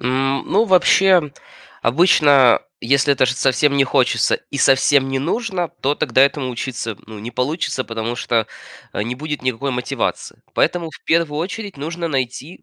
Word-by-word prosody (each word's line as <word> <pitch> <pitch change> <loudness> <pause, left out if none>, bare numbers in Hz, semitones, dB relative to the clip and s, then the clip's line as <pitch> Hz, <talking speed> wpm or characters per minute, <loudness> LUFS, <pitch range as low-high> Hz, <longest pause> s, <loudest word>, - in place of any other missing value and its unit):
М, 135 +2 -1
ну, 215 +4 +3
вообще, 185 -5 +4 0.5
обычно, 140 -2 +4 0.2
если 140 +3 +2
это 130 - +2
ж - - +1
совсем 140 +2 +1
не 135 - +4
хочется 130 -2 +1 0.2
и 140 - -5
совсем 135 0 +3
не 135 0 -1
нужно, 185 - -2
то 140 +2 +1
тогда 130 - +2
этому 140 -2 +1
учиться, 120 -3 -5
ну, 110 -1 -10
не 115 +3 -7
получится, 130 +2 -2
потому 115 +1 -4
что, 115 -2 0 0.5
а, - - -2
не 120 +3 -4
будет 150 +1 -5
никакой 130 +2 -2
мотивации. 125 -1 -4
Поэтому, 170 -2 0
в - - -15
1 160 -2 +1
очередь, 200 +1 -6
нужно 165 +4 -4
найти 135 +3 -4
140 Hz, 160 wpm, -19 LUFS, 125-160 Hz, 0.5 s, вообще